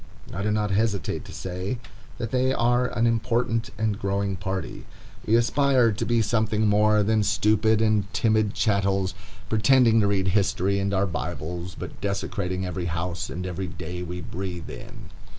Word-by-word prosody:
I 100 - -3
do 105 - 0
not 105 -1 0
hesitate 100 0 0
to - - -10
say 95 +6 -4 0.4
that 115 - -4
they 130 0 +2
are 120 +1 +2
an 115 -1 0
important 115 0 0
and 110 -1 -1
growing 100 0 -1
party. 95 -1 -5 0.4
We 110 - +4
aspire 125 0 +3
to 105 - -3
be 115 -1 +2
something 110 0 +1
more 105 0 +4
than 110 +1 +2
stupid 110 +1 +2
and 105 -3 +1
timid 110 -2 +1
chattels, 100 -3 +1 0.3
pretending 115 +1 +4
to 105 - +3
read 95 -2 +1
history 100 0 +1
and 100 0 -1
our 100 0 +2
bibles, 85 0 -4
but - - -8
desecrating 95 -2 -2
every 90 -1 -3
house 85 +2 -3
and 90 +1 -5
every 90 +1 -3
day 90 0 -6
we 90 0 -5
breathe 90 0 -6
in. - - -11
100 Hz, 165 wpm, -25 LUFS, 95-110 Hz, 0.4 s, We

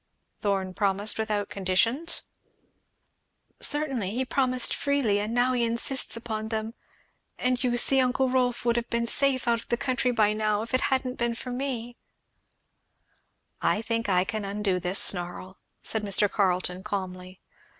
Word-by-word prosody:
"Thorn 195 -3 -1
promised 200 +2 -1
without 210 -2 -1
conditions?" 225 - 0 1.4
"Certainly 270 -10 0
he 260 +1 0
promised 255 -1 +1
freely 275 -8 +1
and 210 +2 -2
now 245 +2 +2
he 245 -1 +1
insists 235 +2 0
upon 220 -2 -4
them; 220 0 -3 0.6
and 250 0 0
you 240 -1 +1
see 270 +2 +3
uncle 260 +1 +2
Rolf 250 -2 0
would 235 0 +2
have 235 - -2
been 235 0 0
safe 260 +1 +3
out 235 -1 +3
of - - -14
the 235 - +1
country 255 -1 0
now, 215 -1 +2
if 230 - -9
it 255 - +3
hadn't 260 -1 -1
been 235 -1 0
for 250 +1 -6
me 245 -2 -4 1.2
" - - -44 0.2
"I 220 - -4
think 230 -1 -1
I 180 -1 +4
can 210 +2 -4
undo 200 -2 -1
this 180 +2 -1
snarl," 180 +1 +1 0.2
said 220 - -1
Mr. 205 0 +2
Carleton 185 -2 0
calmly. 185 -2 -5
230 Hz, 155 wpm, -27 LUFS, 200-250 Hz, 1.4 s, I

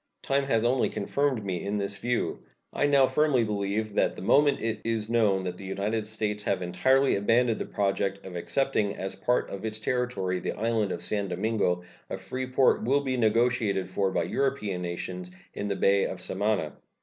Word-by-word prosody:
Time 140 0 +1
has 115 -4 +1
only 125 +1 +2
confirmed 130 +1 -1
me 90 -3 -2
in 100 +1 -2
this 100 -1 -2
view. 120 0 -1 0.3
I 145 - +2
now 140 -2 +5
firmly 145 -3 +2
believe 105 0 -2
that - - +1
the - - -8
moment 145 +6 +4
it 110 -1 -2
is 115 -1 -2
known 105 -5 +3
that 90 -1 -4
the 100 - -10
United 100 +3 -2
States 105 -1 -2
have 95 -3 -1
entirely 130 +10 +3
abandoned 115 +3 +2
the - - -2
project 100 0 -1
of 95 -2 -8
accepting 105 +1 0
as 95 0 -4
a 95 - -16
part 125 - +1
of 100 - -6
its 110 -1 -2
territory 110 -6 -1
the - - -3
island 110 -2 0
of - - -4
San 100 -2 -1
Domingo 95 -2 0 0.3
a - - -3
free 130 +7 -5
port 130 -2 +3
will 135 +5 +2
be 130 -2 -1
negotiated 115 -4 +2
for 95 -1 0
by 85 - 0
European 105 -2 -1
nations 90 +1 -5 0.2
in 105 - -4
the 100 - -1
Bay 100 0 +3
of - - -6
Samana. 100 -6 -1
105 Hz, 195 wpm, -27 LUFS, 95-125 Hz, 0.3 s, now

